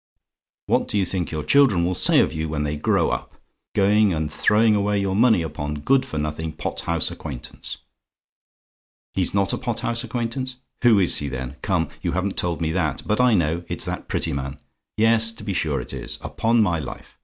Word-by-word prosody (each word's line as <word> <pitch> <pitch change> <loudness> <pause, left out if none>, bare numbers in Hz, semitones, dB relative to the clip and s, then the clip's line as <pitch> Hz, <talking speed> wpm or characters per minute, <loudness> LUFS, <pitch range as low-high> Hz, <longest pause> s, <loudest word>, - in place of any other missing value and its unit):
What - - +1
do - - -1
you 95 - +2
think 90 -3 -2
your 75 -1 -3
children 100 - +4
will 90 - 0
say 85 - +4
of - - 0
you 80 0 -3
when 75 -1 -2
they 75 0 -2
grow 75 - +1
up - - -4 0.4
going 105 0 +4
and 80 -1 -2
throwing 110 +4 +3
away 100 0 +1
your 95 -1 -1
money 110 -5 +4
upon 75 -2 -4
good 130 - +2
for 80 - -5
nothing 75 +1 -3
pot - - -4
house - - 0
acquaintance? 65 -6 -7 1.4
"HE'S - - +1
NOT 100 0 +2
A - - -2
POT 120 -3 -3
HOUSE 120 0 -1
ACQUAINTANCE? 125 +2 -3 0.3
"Who 120 -4 +6
is 95 -3 +5
he, 75 - -3
then? 65 0 -5
Come, 90 -6 0
you - - -2
haven't 95 +2 -1
told 85 -2 -1
me 80 -1 0
that; 80 -5 -1
but 105 +4 +1
I 125 -3 +5
know 85 -1 0
it's - - -3
that - - -4
Prettyman! 70 0 -2 0.4
Yes, 115 +1 +4
to 115 - -11
be 100 - -2
sure 75 -5 0
it - - -7
is! - - -6
Upon 115 0 +2
my 85 -5 0
life! 75 - -9
95 Hz, 200 wpm, -23 LUFS, 75-110 Hz, 1.4 s, Who